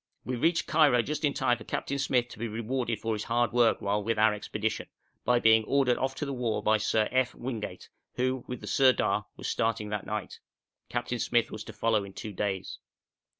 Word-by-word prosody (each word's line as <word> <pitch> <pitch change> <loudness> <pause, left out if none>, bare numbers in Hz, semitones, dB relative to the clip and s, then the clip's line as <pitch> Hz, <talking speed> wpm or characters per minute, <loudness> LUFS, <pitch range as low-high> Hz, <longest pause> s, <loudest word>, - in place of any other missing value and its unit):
We 125 - -2
reached 165 +8 +2
Cairo 150 -7 +4
just 150 +5 -4
in 145 -2 +2
time 120 -1 +1
for - - -9
Captain 140 0 -3
Smyth 125 -3 +1
to - - -11
be 115 - -2
rewarded 115 +1 -2
for 115 0 -1
his 105 -1 -3
hard 120 +1 +1
work, 120 -1 +3
while 100 +1 0
with 115 +1 0
our 110 0 +5
expedition, 105 +1 -3 0.4
by 125 +1 +4
being 110 -1 +5
ordered 135 -2 +2
off 135 0 -1
to 145 - -3
the 140 - -3
war 120 -4 -1
by 110 0 +4
Sir 110 0 +1
F. 130 -1 +1
Wingate, 110 -7 -5 0.3
who, 130 0 0
with 125 -2 -6
the - - -8
Sirdar, 105 -6 +3
was - - -5
starting 110 -2 0
that 105 -2 -4
night; 105 -3 -4 0.5
Captain 120 0 -2
Smyth 120 -1 +1
was 110 - -6
to 110 - -9
follow 110 0 +1
in 100 -1 -10
two 105 +1 -7
days. 95 -1 -3
115 Hz, 210 wpm, -29 LUFS, 105-125 Hz, 0.5 s, our